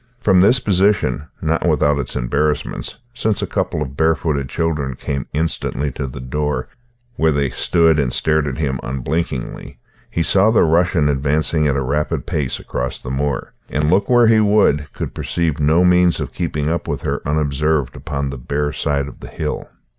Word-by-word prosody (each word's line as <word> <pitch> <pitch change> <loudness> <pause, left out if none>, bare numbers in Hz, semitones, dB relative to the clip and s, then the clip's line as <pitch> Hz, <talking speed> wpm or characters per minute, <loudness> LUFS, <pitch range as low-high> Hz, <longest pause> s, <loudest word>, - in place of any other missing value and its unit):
From 95 -5 +4
this 110 +7 +5
position 100 - +1 0.2
not 80 +2 +1
without 75 -2 +2
its 70 - -4
embarrassments, 70 +5 -1 0.2
since 110 -3 -1
a - - +1
couple 75 - -1
of 70 -1 -8
barefooted 80 -3 +1
children 75 -5 -1
came 70 +2 -4
instantly 75 -2 -2
to 65 - -4
the 65 +1 -8
door, 65 0 -2 0.5
where 80 0 +3
they 70 -3 0
stood 80 +2 +3
and 65 -4 +1
stared 80 -1 +1
at 65 - -3
him 70 -5 -1
unblinkingly 70 +2 -3 0.3
he 85 - -1
saw 100 +5 +4
the 110 - +4
Russian 85 -1 +3
advancing 75 +2 +1
at 70 - +1
a 70 - 0
rapid 75 +4 -1
pace 70 -4 -2
across 60 +1 -3
the 65 - -7
moor; 70 -1 -2 0.2
and, 75 +2 0
look 100 +2 +2
where 120 -1 +6
he 110 -1 +5
would, 100 -9 +3
could - - -5
perceive 80 -3 -1
no 80 +4 +4
means 90 -1 +4
of - - -4
keeping 75 -4 -2
up 85 +1 -1
with - - -3
her - - -2
unobserved 75 0 0
upon 70 -2 -3
the 70 - -7
bare 75 +3 -2
side 70 -1 -1
of 70 - -11
the - - -9
hill. - - -4
75 Hz, 180 wpm, -19 LUFS, 70-85 Hz, 0.5 s, where